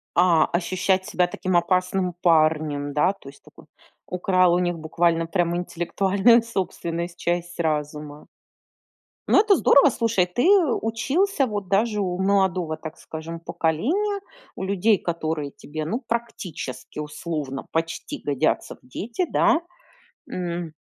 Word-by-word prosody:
А, 170 Hz, -3 st, +5 dB
ощущать 185 Hz, +2 st, 0 dB
себя 180 Hz, -1 st, +1 dB
таким 185 Hz, +1 st, -2 dB
опасным 180 Hz, +1 st, +1 dB
парнем, 155 Hz, -3 st, +2 dB
да, 165 Hz, +6 st, +3 dB
то 140 Hz, -8 st, -13 dB
есть 140 Hz, -, -18 dB, 0.6 s
украл 180 Hz, -1 st, +2 dB
у 180 Hz, -, +2 dB
них 175 Hz, -1 st, 0 dB
буквально 165 Hz, +1 st, +1 dB
прям 170 Hz, 0 st, 0 dB
интеллектуальную 195 Hz, +6 st, +2 dB
собственность, 175 Hz, -5 st, -4 dB
часть 175 Hz, 0 st, -2 dB
разума. 150 Hz, -2 st, -3 dB, 1.0 s
Ну, -, -, +5 dB
это 415 Hz, -1 st, +5 dB
здорово. 285 Hz, -4 st, +6 dB
Слушай, 230 Hz, -6 st, +1 dB
ты 180 Hz, +8 st, -2 dB, 0.4 s
учился 275 Hz, -, +1 dB
вот 205 Hz, -4 st, -4 dB
даже 210 Hz, +2 st, +1 dB
у 180 Hz, -2 st, -2 dB
молодого, 190 Hz, -4 st, +1 dB
так 160 Hz, 0 st, -8 dB
скажем, 165 Hz, +1 st, -7 dB
поколения, 315 Hz, -, -1 dB, 0.3 s
у -, -, -5 dB
людей, 200 Hz, +2 st, +2 dB
которые 160 Hz, -5 st, -3 dB
тебе, 155 Hz, +1 st, -7 dB
ну, 225 Hz, +10 st, -2 dB
практически, 190 Hz, -, -5 dB
условно 150 Hz, -2 st, -5 dB
почти 165 Hz, 0 st, -3 dB
годятся 140 Hz, -3 st, 0 dB
в -, -, -22 dB
дети, 230 Hz, -, -3 dB
да? 335 Hz, -1 st, +3 dB, 0.7 s
М 175 Hz, -3 st, -4 dB
175 Hz, 125 wpm, -24 LUFS, 160-200 Hz, 1.0 s, здорово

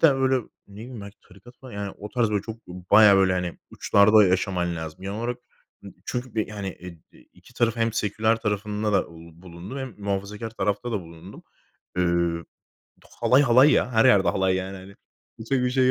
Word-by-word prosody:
de 165 Hz, -, +7 dB
öyle, 135 Hz, -1 st, +2 dB, 0.3 s
ne 100 Hz, -, -15 dB
bileyim, 120 Hz, -1 st, -9 dB
belki 100 Hz, 0 st, -11 dB
tarikat 100 Hz, +7 st, -17 dB
falan 130 Hz, -2 st, -12 dB
yani 100 Hz, -1 st, -5 dB
o 105 Hz, -, -8 dB
tarz 115 Hz, -2 st, 0 dB
böyle 105 Hz, -1 st, 0 dB
çok, 115 Hz, +1 st, -10 dB
bayağı, 100 Hz, +3 st, +5 dB
böyle, 95 Hz, -1 st, +3 dB
hani, 90 Hz, -1 st, -3 dB
uçlarda 105 Hz, +1 st, +4 dB
yaşaman 90 Hz, -2 st, 0 dB
lazım 80 Hz, +2 st, -7 dB
genel 100 Hz, +2 st, -5 dB
olarak. 120 Hz, +1 st, -3 dB, 0.4 s
Imm, -, -, -11 dB
çünkü 125 Hz, 0 st, -5 dB
bi 110 Hz, -, -1 dB
hani, 100 Hz, -2 st, -5 dB
e 90 Hz, -1 st, -9 dB, 0.2 s
d -, -, -20 dB
2 -, -, -21 dB
tarafın 115 Hz, -1 st, 0 dB
hem 115 Hz, -1 st, +1 dB
seküler 110 Hz, 0 st, 0 dB
tarafında 105 Hz, 0 st, -2 dB
da, 95 Hz, -, +2 dB
uuu, 85 Hz, +1 st, -15 dB
bulundum 90 Hz, +9 st, -9 dB
hem 130 Hz, -4 st, -6 dB
muhafazakâr 100 Hz, +2 st, -4 dB
tarafta 105 Hz, +3 st, -2 dB
da 105 Hz, -, -1 dB
bulundum. 85 Hz, +3 st, -13 dB, 0.5 s
Eee, 85 Hz, -1 st, 0 dB, 0.8 s
halay, 130 Hz, +3 st, +4 dB
halay 130 Hz, +3 st, +6 dB
ya. 125 Hz, -, +1 dB
Her 110 Hz, +1 st, +4 dB
yerde 100 Hz, -7 st, +5 dB
halay 95 Hz, -1 st, +1 dB
yani, 95 Hz, +1 st, -5 dB
hani 95 Hz, +1 st, -12 dB, 0.4 s
Kimse 125 Hz, +3 st, -1 dB
bir 125 Hz, -, +1 dB
şey 130 Hz, 0 st, +3 dB
105 Hz, 190 wpm, -24 LUFS, 95-115 Hz, 0.8 s, de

